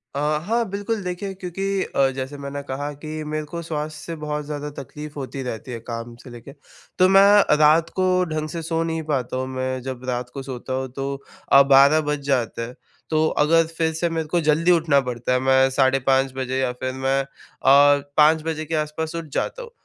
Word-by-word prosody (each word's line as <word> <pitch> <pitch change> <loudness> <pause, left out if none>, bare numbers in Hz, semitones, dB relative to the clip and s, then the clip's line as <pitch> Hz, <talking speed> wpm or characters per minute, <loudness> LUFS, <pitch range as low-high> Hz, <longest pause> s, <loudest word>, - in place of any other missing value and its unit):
अ, - - -1 0.3
हाँ, 230 +4 +1
बिल्कुल 205 +2 -3
देखिए 180 +2 -4
क्योंकि 185 0 -5 0.3
अ, 135 -1 +4
जैसे 135 +2 -5
मैंने 140 0 -6
कहा 145 +2 -3
कि 155 0 -5
मेरे 155 0 -2
को 170 +3 -6
स्वास्थ्य 155 -1 -4
से 165 - -5
बहुत 150 0 -3
ज़्यादा 150 0 -5
तकलीफ़ 150 +3 -9
होती 135 0 -5
रहती 125 0 -6
है 115 - -5
काम 115 0 -7
से 125 - -11
लेके, 120 +3 -11 0.5
तो 185 - +6
मैं 200 -1 +6
रात 155 +2 +4
को 185 - +3 0.2
ढंग 155 0 -2
से 165 +1 -5
सो 165 0 -1
नहीं 165 -1 -3
पाता 130 -2 -1
हूँ। 130 0 -2
मैं 130 0 -2
जब 130 -1 -6
रात 125 0 -3
को 135 -1 -6
सोता 130 0 -6
हूँ 130 0 -2
तो 135 0 -3 0.5
अ, 140 - +9
12 140 +3 +6
बज 150 - -1
जाता 125 -4 0
है, 120 +2 -6 0.3
तो 155 0 +2
अगर 165 +2 +3
फिर 160 -1 +1
से 170 +2 -1
मेरे 165 -1 -3
को 170 +2 0
जल्दी 155 +3 +3
उठना 160 -5 +4
पड़ता 125 0 -2
है, 125 - +2
मैं 130 0 +4
साढ़े 135 0 +2
5 135 0 +2
बजे 130 0 -2
या 130 -2 0
फिर 130 0 -1
मैं 135 +1 0
अ, - - -6 0.9
5 155 +1 +5
बजे 155 -1 -3
के 160 +1 -3
आस-पास 155 +1 -3
उठ 165 -1 -4
जाता - - -2
हूँ, 475 - -10
150 Hz, 210 wpm, -22 LUFS, 130-165 Hz, 0.9 s, अ